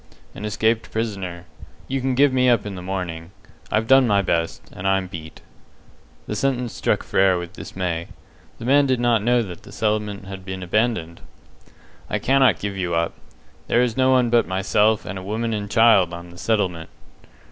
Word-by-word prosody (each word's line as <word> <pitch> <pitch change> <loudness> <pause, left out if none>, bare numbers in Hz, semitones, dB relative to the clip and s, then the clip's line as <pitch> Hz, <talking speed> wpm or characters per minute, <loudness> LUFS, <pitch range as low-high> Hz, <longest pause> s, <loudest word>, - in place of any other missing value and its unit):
"An 105 - -7
escaped 110 +2 0
prisoner. 95 -6 -4 0.4
You 135 0 -2
can 130 0 0
give 140 0 +4
me 130 -1 +3
up 115 -4 +2
in 105 - -5
the 90 - -7
morning. 90 -3 -5 0.4
I've 110 +1 +1
done 135 +1 +5
my 100 -2 +3
best, 85 -7 -1
and 95 - -5
I'm 95 -1 +2
beat." 80 -3 -9 0.8
The 105 - -4
sentence 125 0 -1
struck - - 0
Frere 95 -1 +3
with 85 +1 -6
dismay. 85 -2 -4 0.5
The - - -8
man 140 +2 +4
did 130 -2 +1
not 120 -3 +2
know 120 +2 +2
that 90 -5 -9
the - - -14
settlement 105 -2 -2
had 95 -1 -8
been 95 0 -6
abandoned! 95 -4 -1 0.9
"I - - 0
cannot 135 0 +3
give 100 -1 -4
you 90 -3 -2
up. 85 0 0 0.5
There 120 - +3
is 120 -3 -1
no 130 0 +3
one 125 -2 +3
but 120 -1 +3
myself 105 +3 +1
and 95 +1 -5
a - - -9
woman 110 +3 -2
and 105 -1 -3
child 105 -7 +4
on 85 0 -10
the 85 - -14
settlement." 90 -7 -1
105 Hz, 185 wpm, -22 LUFS, 90-120 Hz, 0.9 s, done